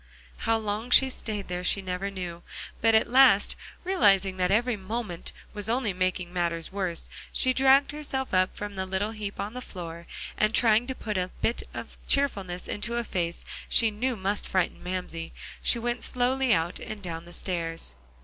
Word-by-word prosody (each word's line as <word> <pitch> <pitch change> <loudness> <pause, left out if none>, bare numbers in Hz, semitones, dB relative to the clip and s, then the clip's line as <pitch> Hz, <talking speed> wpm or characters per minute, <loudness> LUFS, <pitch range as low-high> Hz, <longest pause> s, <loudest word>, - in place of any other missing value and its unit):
How 225 - +5
long 215 +2 -3
she 265 +1 +6
stayed 210 -5 -3
there 180 0 -3
she 190 - +3
never 190 +1 -3
knew. 180 -3 -6 0.4
But 225 0 +5
at 220 - +4
last, 245 -5 +6 0.3
realizing 200 - +3
that 180 -1 +2
every 235 +4 +2
moment 200 -2 -4
there - - -18
was 210 0 -3
only 235 -4 +1
making 180 -1 -1
matters 170 -2 -1
worse, 185 -4 -2 0.2
she 255 - +3
dragged 270 +2 +5
herself 280 -4 -3
up 185 0 +2
from 205 0 -5
the 190 -1 -3
little 190 +3 -1
heap 210 -2 -6
on 200 +2 -3
the 250 - -5
floor, 170 -6 -7 0.3
and 215 +1 +3
trying 230 0 +4
to 260 - -3
put 210 -5 -2
a 180 0 -1
bit 230 - +2
of - - -7
cheerfulness 195 -11 +1
into 235 +3 -2
a 235 - 0
face 175 -5 -3 0.2
she 225 -2 +5
knew 245 +4 -1
must 200 0 -1
frighten 185 -2 0
Mamsie, 180 -2 -4 0.3
she - - +2
went 240 +1 -2
slowly 255 +1 +1
out, 170 -4 +1
and 210 -2 -7
down 165 -2 -5
the 175 - -11
stairs. 165 - 0
205 Hz, 185 wpm, -27 LUFS, 180-235 Hz, 0.4 s, she